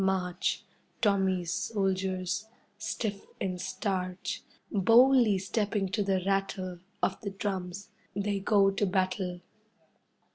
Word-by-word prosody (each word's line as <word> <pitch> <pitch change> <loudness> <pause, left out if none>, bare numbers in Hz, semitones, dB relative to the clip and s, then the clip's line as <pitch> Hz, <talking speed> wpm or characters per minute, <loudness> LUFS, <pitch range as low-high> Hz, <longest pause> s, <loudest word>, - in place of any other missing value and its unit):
March 185 -1 0 0.4
Tommy's 190 -5 +2
soldiers, 190 -1 -1 0.3
stiff 215 -1 -3 0.2
and 185 -2 -2
starch, 185 -1 -2 0.3
Boldly 230 +2 +6
stepping 200 0 0
to 210 - 0
the 190 -2 +1
rattle 195 -2 -1 0.2
Of - - +1
the 200 - -3
drums, 195 -1 -4 0.3
they 200 0 0
go 195 0 +4
to 195 +1 +1
battle. 185 -1 0
195 Hz, 105 wpm, -30 LUFS, 185-205 Hz, 0.4 s, Boldly